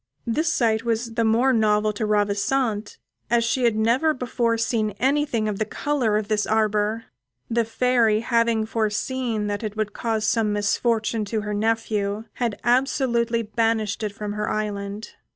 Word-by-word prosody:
This 310 +8 0
sight 225 -5 +1
was 230 0 -1
the 230 - +1
more 235 +4 +3
novel 215 -1 +2
to 215 +1 -2
Ravissante 210 +2 0 0.3
as 235 0 +3
she 245 +2 +1
had 230 -2 +3
never 245 +9 +2
before 235 -2 0
seen 220 -3 -1
anything 265 -4 +1
of 205 -2 -3
the - - +2
colour 235 -1 0
of 215 -1 -2
this 210 -1 0
arbour. 215 0 +1 0.5
The 230 0 +2
Fairy 225 -2 +2
having 230 -2 +1
foreseen 220 +1 -1
that 205 -1 -2
it 215 0 -5
would 215 -1 -2
cause 220 -2 -1
some 220 -1 +1
misfortune 220 +2 0
to 215 +1 -2
her 210 0 -4
nephew, 215 -1 -1 0.2
had 230 -4 -1
absolutely 240 -2 +1
banished 220 -1 0
it 210 -2 -2
from 205 0 -5
her 210 0 -2
island. 205 0 -4
220 Hz, 160 wpm, -23 LUFS, 210-235 Hz, 0.5 s, more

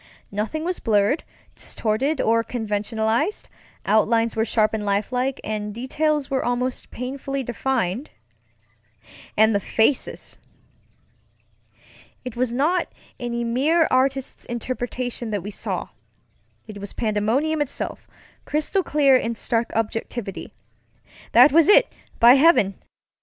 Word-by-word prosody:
Nothing 220 +10 -3
was 360 +1 -2
blurred, 210 +6 +2 0.3
distorted, 260 +7 -2
or 230 +1 +2
conventionalized; 220 - -1 0.4
outlines 225 +1 +2
were 220 - +1
sharp 220 -1 +1
and 215 -1 -2
lifelike, 245 +6 -1
and 210 -1 -4
details 295 +4 -1
were 265 -1 -1
almost 245 +1 -2
painfully 270 +2 -4
defined. 245 -1 -2 1.3
And 220 +1 +5
the 200 - +2
faces! 225 +6 -1 1.9
It 250 -2 -6
was 245 0 0
not 310 +9 0 0.3
any 235 -1 -3
mere 290 +8 +2
artist's 265 +1 0
interpretation 245 0 -4
that 205 -4 -3
we 205 - -6
saw; - - -4 0.8
it 215 -2 -9
was 200 0 -8
pandemonium 235 +8 0
itself, 285 -1 -4 0.4
crystal 305 +6 0
clear 290 -6 +3
in 235 -2 0
stark 230 +1 -1
objectivity. 225 -2 -3 0.8
That - - +8
was 325 +2 +5
it, 415 - +5 0.3
by 235 +1 +8
heaven! 270 - +4
240 Hz, 115 wpm, -23 LUFS, 220-275 Hz, 1.9 s, That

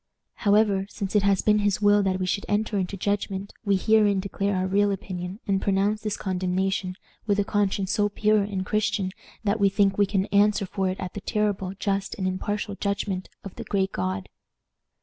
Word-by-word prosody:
However, 205 -2 +3
since 200 0 -5
it 210 - +5
has 200 -1 +2
been 210 0 +4
his 205 -2 +1
will 205 0 +5
that 190 -1 0
we 185 - -1
should 200 +2 -2
enter 210 +1 0
into 190 +1 -3
judgment, 200 0 -2
we 200 -2 +2
herein 205 0 +3
declare 200 +1 -1
our 185 0 0
real 200 +2 +2
opinion, 185 0 -5
and 195 -1 +1
pronounce 200 +2 +1
this 215 -2 -2
condemnation, 185 0 -1 0.3
with 205 -1 +2
a 205 - +3
conscience 200 -2 0
so 205 -1 +2
pure 215 +1 +2
and 195 -2 -3
Christian 200 -2 0 0.3
that 210 +1 +1
we 200 -1 +4
think 195 0 +2
we 205 - +4
can 195 -1 0
answer 200 0 +4
for 190 0 -1
it 185 - -4
at 185 -1 -5
the 205 - -6
terrible, 200 -3 -1
just, 195 0 -2
and 190 -2 -2
impartial 205 +2 -2
judgment 200 -2 -2
of 195 - -8
the - - -5
Great 195 -1 0
God. 95 0 -3
200 Hz, 195 wpm, -25 LUFS, 190-205 Hz, 0.3 s, it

